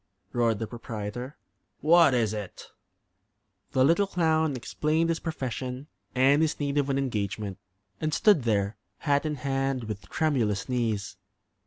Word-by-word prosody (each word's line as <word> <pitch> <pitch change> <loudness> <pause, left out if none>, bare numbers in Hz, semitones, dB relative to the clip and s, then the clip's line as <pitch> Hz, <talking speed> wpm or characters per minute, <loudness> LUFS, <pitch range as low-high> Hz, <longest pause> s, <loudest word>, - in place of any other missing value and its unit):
roared 115 -3 +2
the 115 - -3
proprietor. 115 +3 -6 0.4
"What 165 -3 +6
is 110 -3 +1
it?" 105 -3 -7 1.0
The 130 0 +4
little 170 +7 +3
clown 160 -5 +1
explained 155 +6 0
his 165 - 0
profession 130 -3 -4 0.3
and 135 +4 +5
his 160 -1 0
need 145 0 0
of 140 0 0
an 135 - +1
engagement; 105 -6 -2 0.4
and 155 - -1
stood 200 0 +4
there, 105 -3 0 0.2
hat 145 0 +1
in 150 - -2
hand, 135 -1 -1
with 105 -2 -6
tremulous 115 -11 0
knees. 115 -6 -1
130 Hz, 140 wpm, -27 LUFS, 110-155 Hz, 1.0 s, What